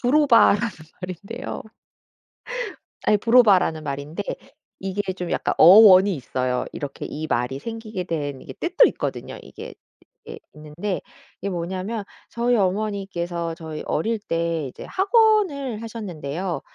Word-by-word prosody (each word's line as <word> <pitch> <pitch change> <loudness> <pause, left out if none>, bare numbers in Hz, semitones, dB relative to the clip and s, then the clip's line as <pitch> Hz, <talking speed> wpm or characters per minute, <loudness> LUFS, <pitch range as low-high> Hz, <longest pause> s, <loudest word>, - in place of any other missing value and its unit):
부로바라는 245 -5 +4 0.3
말인데요. 200 +8 -6 1.4
아이 210 - +4
부로바라는 205 -9 +4
말인데 145 +6 -4 0.6
이게 195 0 -3
좀 180 -2 -5
약간 - - 0
어원이 195 +1 +8
있어요. 125 -1 -2
이렇게 140 -2 -6
이 155 +1 -5
말이 125 +2 -1
생기게 225 -2 -5
된 145 -6 -4
이게 - - -9
뜻도 - - +3
있거든요. - - -5
이게 - - -10 0.5
이게 - - -9
있는데 155 +6 -5 0.4
이게 200 - -2
뭐냐하면 190 +5 -3 0.3
저희 240 +1 +1
어머니께서 185 -4 -1
저희 160 -2 -7
어릴 220 +8 -1
때 165 -6 -2
이제 - - -10
학원을 385 - +2
하셨는데요. 185 -6 -5
185 Hz, 295 characters per minute, -23 LUFS, 160-225 Hz, 1.4 s, 어원이